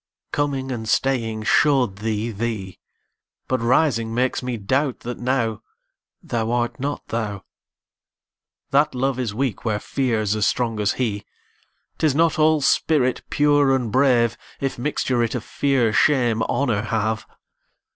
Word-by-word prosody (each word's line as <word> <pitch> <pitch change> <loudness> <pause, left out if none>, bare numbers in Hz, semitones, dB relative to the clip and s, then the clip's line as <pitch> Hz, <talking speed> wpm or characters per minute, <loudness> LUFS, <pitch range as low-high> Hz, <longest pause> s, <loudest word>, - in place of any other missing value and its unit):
Coming 135 -2 -1
and 110 -3 -4
staying 115 -5 0
show'd 125 -5 +3
thee 110 +1 -2
thee; 105 -3 -4 0.7
But 130 -2 0
rising 115 -2 +2
makes 125 +1 0
me 125 -2 -3
doubt 130 +6 -1
that 120 +1 -6
nowThou 115 -1 -4
art 120 -1 -1
not 145 +2 -3
thou. 105 -4 -3 1.3
That 145 0 +3
Love 130 0 0
is 115 -5 -2
weak 130 -4 -2
where 105 -3 0
Fear's 110 -5 -1
as 105 -1 +1
strong 115 -3 -1
as 105 0 +1
he;'Tis 125 +5 -4
not 165 0 +2
all 155 0 +4
spirit 135 -2 +2
pure 145 -2 +3
and 120 -4 -2
brave, 120 -2 +3 0.2
If 135 -3 -3
mixture 130 -2 0
it 115 +1 -1
of 120 - -3
Fear, 130 -6 +1
Shame, 120 -4 +3
Honour 115 -2 0
have. 110 0 -2
120 Hz, 135 wpm, -22 LUFS, 110-135 Hz, 1.3 s, all